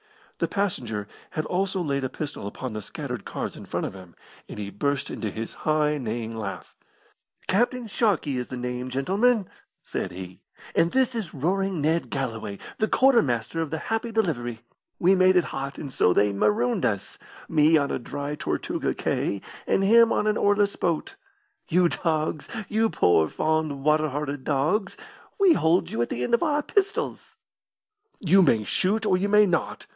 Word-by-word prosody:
The - - +1
passenger 120 - -2 0.2
had 155 - -3
also 190 +1 -1
laid 140 -3 -1
a 130 - -1
pistol 145 -9 -5
upon 125 +3 -6
the 110 - -4
scattered - - -6
cards - - -5
in - - -11
front - - -2
of - - -5
him, 90 -3 -13 0.3
and - - -8
he 100 -1 -5
burst 140 +7 -1
into 110 - -3
his 110 +3 -5
high, 150 -1 +1
neighing 115 -2 -4
laugh. 105 -3 -6 0.7
"Captain 240 +5 +1
Sharkey 195 - 0
is 125 - -4
the 130 - -6
name, 125 +1 -4
gentlemen," 195 - +2 0.4
said - - -3
he, 90 0 -9 0.3
"and 170 - +3
this 260 -1 +2
is 220 -10 -4
Roaring 190 +5 0
Ned 160 +3 +1
Galloway, 115 -7 -3 0.2
the 215 - +2
quartermaster 165 - +2
of 160 - -2
the 160 - -2
Happy 225 +6 -2
Delivery. 120 - -1 0.4
We 180 +3 +4
made 185 0 +5
it 180 - +5
hot, 135 +1 -4
and 140 -3 -7
so - - +3
they 100 +2 +3
marooned 105 +4 +1
us: 100 -2 -2 0.3
me 155 +1 +4
on 140 -2 0
a - - -1
dry 145 +4 -5
Tortuga 150 - -2
cay, 100 - -1 0.3
and 195 - +2
him 230 +3 +6
in - - +1
an 215 0 +2
oarless 205 0 +2
boat. 175 - -1 0.5
You 175 +1 +4
dogs 155 -3 -1 0.2
you 220 +1 +2
poor, 80 - +3
fond, 155 -3 -1
water 155 +1 +3
hearted 145 -1 -4
dogs 155 +10 0 0.4
we 385 -4 +6
hold 170 - +2
you 115 - -1
at 120 - 0
the 125 - -2
end 125 - -2
of 235 - +4
our 300 -3 +1
pistols!" 405 +4 -1 0.8
"You 190 +1 +5
may 115 -11 +4
shoot, 200 - 0
or 185 - +3
you 195 +3 0
may 210 +1 +6
not!" 175 -4 -1
155 Hz, 175 wpm, -25 LUFS, 125-195 Hz, 0.8 s, him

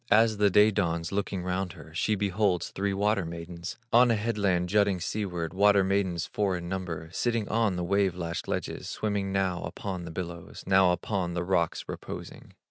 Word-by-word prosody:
As 110 0 +5
the 105 0 +4
day 105 +3 +6
dawns, 85 -5 -1
looking 100 -2 -2
round 90 0 -2
her, 80 - -13
She 105 +5 +1
beholds 100 -3 0
three 100 +1 -1
water 100 0 +1
maidens, 85 +1 -6 0.2
On 120 +1 +7
a 115 - +4
headland 100 -5 0
jutting 100 -1 +3
seaward, 90 -3 -3
Water 100 +1 +5
maidens 95 -3 0
four 100 -3 0
in 85 0 -6
number, 85 -3 -4
Sitting 115 +2 0
on 110 -4 +2
the 90 - -2
wave 95 0 +2
lashed 85 -1 -4
ledges, - - -3
Swimming 100 -2 -2
now 95 -2 0
upon 95 -3 -5
the 85 - -7
billows, 85 -1 -7
Now 95 -1 +5
upon 90 0 -2
the 85 - -1
rocks 90 -3 0
reposing. - - -8
95 Hz, 180 wpm, -28 LUFS, 85-100 Hz, 0.2 s, On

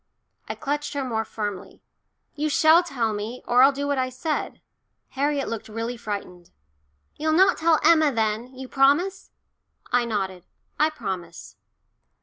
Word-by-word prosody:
I - - -3
clutched 295 +1 -3
her 280 - -1
more 225 -4 -1
firmly. 205 -4 -6 0.5
"You 305 +1 -2
shall 315 +3 +5
tell 245 -10 -2
me, 215 +4 -5
or 245 +1 +4
I'll 270 +2 +7
do 280 +1 -4
what 285 -1 0
I 255 0 0
said." 300 +5 -3 0.5
Harriet 280 0 -1
looked 225 -1 -5
really 230 +3 -4
frightened. 200 -6 -7 0.7
"You'll 315 +1 0
not 370 +3 +4
tell 325 -1 +3
Emma, 315 -3 +5
then? 225 +1 -1
You 260 0 -7
promise?" 290 +9 +2 0.6
I 245 0 +2
nodded. 190 -5 -3 0.3
"I 305 +1 +4
promise." 190 - -7
255 Hz, 145 wpm, -24 LUFS, 220-300 Hz, 0.7 s, I'll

